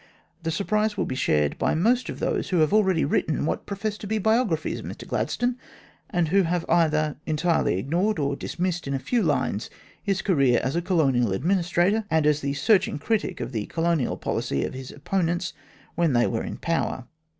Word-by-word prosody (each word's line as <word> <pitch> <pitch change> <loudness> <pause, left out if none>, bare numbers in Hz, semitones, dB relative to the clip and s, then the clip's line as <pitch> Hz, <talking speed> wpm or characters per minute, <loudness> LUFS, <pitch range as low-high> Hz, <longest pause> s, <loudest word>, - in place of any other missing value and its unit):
The 165 - -2
surprise 210 +5 0
will - - 0
be - - -3
shared 75 - +1
by - - +1
most 230 +8 +2
of - - -5
those - - -1
who 185 - +1
have 155 +2 +3
already 190 -7 +3
written 150 0 0
what - - -2
profess 205 +1 -3
to 205 - -7
be 220 +2 0
biographies 220 -6 +1
of - - -9
Mr - - -8
Gladstone, 245 0 -1 0.5
and 175 -5 0
who 195 +4 +4
have 175 -1 -1
either 155 -3 +2
entirely 160 - +1
ignored, 175 - 0
or 140 -2 0
dismissed 175 +1 -3
in 140 - -1
a - - +1
few 225 - 0
lines, 135 - 0 0.3
his 195 -2 -1
career 140 - +3
as 135 +4 -1
a 170 - +1
Colonial 135 - +2
Administrator 180 - +1
and 160 -2 +2
as 150 0 +3
the 140 0 -2
searching 195 +5 +2
critic 200 +2 -1
of 120 0 -4
the 110 -4 -3
Colonial 165 -5 0
policy 70 - -1
of - - -5
his 130 0 -7
opponents 175 +3 -1 0.4
when 170 -4 +1
they 120 0 +4
were 115 - -1
in - - -5
power. 165 -6 -2
165 Hz, 195 wpm, -25 LUFS, 140-195 Hz, 0.5 s, who